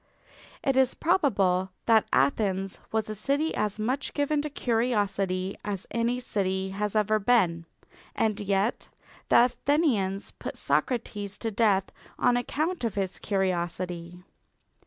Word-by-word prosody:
It 270 Hz, -, +1 dB
is 265 Hz, -1 st, +3 dB
probable 200 Hz, -, +2 dB, 0.2 s
that 225 Hz, -2 st, +4 dB
Athens 190 Hz, -, +1 dB
was 220 Hz, -1 st, 0 dB
a 215 Hz, -, -3 dB
city 280 Hz, +9 st, 0 dB
as 210 Hz, -1 st, -1 dB
much 255 Hz, +6 st, -2 dB
given 290 Hz, 0 st, +1 dB
to 300 Hz, -, -4 dB
curiosity 205 Hz, -7 st, 0 dB
as 200 Hz, -2 st, -3 dB
any 235 Hz, +2 st, 0 dB
city 190 Hz, -5 st, -1 dB
has 210 Hz, +2 st, -2 dB
ever 215 Hz, 0 st, +3 dB
been, 185 Hz, -7 st, +2 dB, 0.5 s
and 215 Hz, -2 st, +1 dB
yet 200 Hz, +2 st, 0 dB, 0.4 s
the 240 Hz, -, +7 dB
Athenians 245 Hz, -, 0 dB
put -, -, -7 dB
Socrates 210 Hz, -5 st, -1 dB
to 225 Hz, -, -3 dB
death 200 Hz, -3 st, +2 dB, 0.3 s
on 245 Hz, -1 st, +3 dB
account 310 Hz, +7 st, -1 dB
of 225 Hz, -4 st, -1 dB
his 195 Hz, -2 st, -2 dB
curiosity. 180 Hz, -2 st, -2 dB
210 Hz, 130 wpm, -27 LUFS, 190-245 Hz, 0.5 s, the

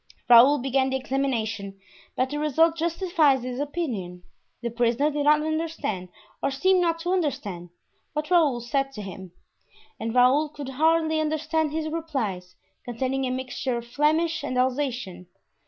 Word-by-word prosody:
Raoul 245 Hz, +5 st, +8 dB
began 265 Hz, 0 st, +1 dB
the 265 Hz, -, -1 dB
examination, 230 Hz, -7 st, -2 dB, 0.4 s
but 255 Hz, +1 st, 0 dB
the 295 Hz, -, -2 dB
result 320 Hz, +2 st, +3 dB
justified 330 Hz, -4 st, +2 dB
his 250 Hz, +1 st, -5 dB
opinion. 245 Hz, -, -4 dB, 0.4 s
The 235 Hz, -, -2 dB
prisoner 240 Hz, +5 st, +1 dB
did 290 Hz, 0 st, -2 dB
not 300 Hz, 0 st, +4 dB
understand, 315 Hz, -, -3 dB, 0.3 s
or -, -, +1 dB
seemed 365 Hz, +7 st, +2 dB
not 335 Hz, -1 st, +1 dB
to 355 Hz, +2 st, -1 dB
understand, 205 Hz, -, -2 dB, 0.4 s
what 300 Hz, +2 st, -3 dB
Raoul 300 Hz, -9 st, +3 dB
said 270 Hz, +3 st, -1 dB
to 210 Hz, -, -7 dB
him; 190 Hz, -1 st, -9 dB, 0.7 s
and 225 Hz, +2 st, -3 dB
Raoul 260 Hz, +5 st, +4 dB
could 290 Hz, -2 st, -8 dB
hardly 315 Hz, +3 st, +2 dB
understand 310 Hz, 0 st, 0 dB
his 315 Hz, 0 st, -2 dB
replies, 255 Hz, -, -4 dB, 0.3 s
containing 260 Hz, +3 st, -2 dB
a -, -, -2 dB
mixture 255 Hz, -1 st, -3 dB
of 235 Hz, -, -6 dB
Flemish 315 Hz, +5 st, +1 dB
and 255 Hz, -3 st, -3 dB
Alsatian. 250 Hz, -8 st, -1 dB
270 Hz, 150 wpm, -25 LUFS, 240-315 Hz, 0.7 s, Raoul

